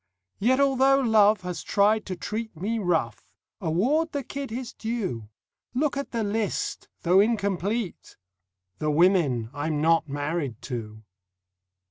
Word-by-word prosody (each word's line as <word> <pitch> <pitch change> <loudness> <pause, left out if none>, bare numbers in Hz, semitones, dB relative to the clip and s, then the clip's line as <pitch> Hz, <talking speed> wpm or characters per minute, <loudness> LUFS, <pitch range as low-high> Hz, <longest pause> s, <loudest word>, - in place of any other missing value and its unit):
Yet 255 +6 +3
although 270 0 +4
Love 215 -5 +4
has 180 -3 -5
tried 215 +2 +2
to 185 - -3
treat 215 +1 -5
Me 220 +7 -2
rough, 165 - -1 0.3
award 270 - +1
the 285 -1 -2
kid 275 +3 -6
his 240 +1 -5
due. 195 - -4 0.5
Look 290 +3 +1
at 280 0 -3
the 230 -2 -2
list, 210 0 -2 0.2
though 180 +2 +5
incomplete: 205 -1 -1 0.6
The 155 - 0
women 150 - +3
I'm 150 +1 -2
not 165 0 +3
married 145 -4 -3
to. 110 -4 -6
200 Hz, 130 wpm, -26 LUFS, 160-230 Hz, 0.6 s, though